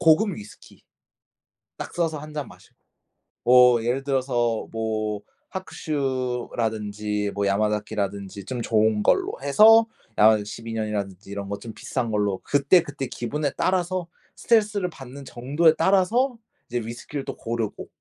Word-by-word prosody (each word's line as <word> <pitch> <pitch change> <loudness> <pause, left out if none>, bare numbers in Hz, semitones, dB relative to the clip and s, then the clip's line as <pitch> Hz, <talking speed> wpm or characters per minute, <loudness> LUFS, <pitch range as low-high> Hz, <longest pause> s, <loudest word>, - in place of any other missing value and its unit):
고급 165 +7 +5
위스키 105 0 -13 1.0
딱 - - -7
써서 165 -3 0
1 150 +1 -10
잔 150 -4 -4
마시고. - - -17 0.7
뭐 125 -2 +6
예를 125 +3 0
들어서 125 -4 0
뭐 110 -2 -2 0.3
하쿠슈라든지 120 - -2
뭐 100 0 0
야마자키라든지 100 -1 -1
좀 125 -1 -3
좋은 110 -1 +2
걸로 385 - +2
해서 220 +11 +7 0.3
야마자키 110 -1 +5
12 115 +2 -7
년이라든지 105 -3 -4
이런 100 -1 -5
거 100 0 -4
좀 115 - -8
비싼 120 -4 -3
걸로 105 -3 0
그때그때 145 -1 +2
기분에 145 +6 -2
따라서 185 -1 0 0.3
스트레스를 210 -5 +2
받는 135 -1 -10
정도에 145 +7 +2
따라서 200 +9 +3 0.3
이제 120 - -1
위스키를 120 +5 -6
또 - - -6
고르고. 115 -2 -4
120 Hz, 300 characters per minute, -24 LUFS, 105-155 Hz, 1.0 s, 해서